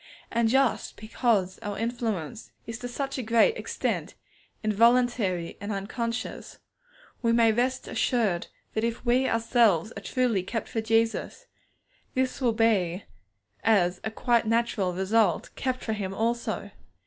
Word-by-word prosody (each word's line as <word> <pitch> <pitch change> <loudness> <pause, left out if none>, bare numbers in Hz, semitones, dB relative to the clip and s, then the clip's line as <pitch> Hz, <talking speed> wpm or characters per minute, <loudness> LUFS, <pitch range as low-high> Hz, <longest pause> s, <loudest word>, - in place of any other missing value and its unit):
Just 265 -1 +1
because 215 -4 0
our 205 -1 -5
influence 225 -3 -3
is 230 0 -6
to 245 - -5
such 275 +2 -3
a - - 0
great 230 - +3
extent - - -3 0.5
involuntary 220 -5 +2
and 205 +1 -4
unconscious, 230 +4 -4 0.6
we 230 -1 +2
may 230 -1 +5
rest 255 +3 0
assured 210 -9 0 0.3
that 220 - -1
if 235 +2 -2
we 250 +2 +3
ourselves 230 -4 +2
are - - -6
truly 245 -6 +1
kept 225 +5 -4
for 225 - -2
Jesus, 225 +1 0 0.7
this 260 +1 0
will 240 -3 +2
be, 205 -5 +1 0.6
as 185 -5 +3
a - - -1
quite 235 +1 +1
natural 225 -4 +1
result, 195 +5 +1
kept 255 0 -2
for 220 - -1
Him 195 -2 -4
also. 235 +2 -2
225 Hz, 135 wpm, -27 LUFS, 205-240 Hz, 0.7 s, may